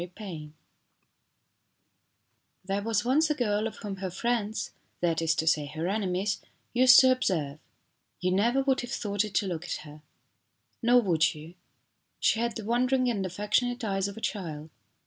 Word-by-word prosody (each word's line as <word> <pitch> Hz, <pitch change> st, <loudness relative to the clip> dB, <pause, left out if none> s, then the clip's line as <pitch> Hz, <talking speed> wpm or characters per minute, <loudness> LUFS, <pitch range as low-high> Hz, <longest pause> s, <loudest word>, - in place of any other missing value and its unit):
THE 175 Hz, -, -4 dB
GOOD 180 Hz, -, -22 dB
NAME 160 Hz, -7 st, -8 dB, 2.1 s
THERE 195 Hz, +1 st, -1 dB
was 220 Hz, 0 st, 0 dB
once 295 Hz, +5 st, +3 dB
a 300 Hz, -, +1 dB
girl 215 Hz, -4 st, 0 dB
of 225 Hz, -, -8 dB
whom 205 Hz, -3 st, -6 dB
her 190 Hz, 0 st, -4 dB
friends 220 Hz, +2 st, -2 dB, 0.3 s
that 165 Hz, -2 st, 0 dB
is 160 Hz, -1 st, +2 dB
to 160 Hz, -, -1 dB
say 155 Hz, -2 st, +2 dB
her 155 Hz, +4 st, -4 dB
enemies 195 Hz, 0 st, -1 dB, 0.3 s
used 250 Hz, 0 st, +8 dB
to 260 Hz, -1 st, +5 dB
observe: 160 Hz, -, -1 dB, 0.6 s
"You 185 Hz, 0 st, 0 dB
never 235 Hz, +8 st, +2 dB
would 265 Hz, -1 st, +1 dB
have 245 Hz, -, -7 dB
thought 205 Hz, -2 st, -1 dB
it 210 Hz, -3 st, -7 dB
to 205 Hz, -, +2 dB
look 175 Hz, -2 st, -4 dB
at -, -, -4 dB
her." 150 Hz, 0 st, -12 dB, 0.8 s
Nor 245 Hz, +1 st, +5 dB
would 165 Hz, -5 st, +2 dB
you. 155 Hz, +3 st, -11 dB, 0.7 s
She 220 Hz, -, +2 dB
had 235 Hz, -1 st, -1 dB
the 220 Hz, -, -6 dB
wondering 250 Hz, +2 st, +2 dB
and 200 Hz, -4 st, -2 dB
affectionate 215 Hz, +6 st, -1 dB
eyes 195 Hz, -2 st, 0 dB
of 200 Hz, -, -8 dB
a -, -, -8 dB
child. 160 Hz, -8 st, -4 dB
205 Hz, 175 wpm, -28 LUFS, 175-235 Hz, 2.1 s, used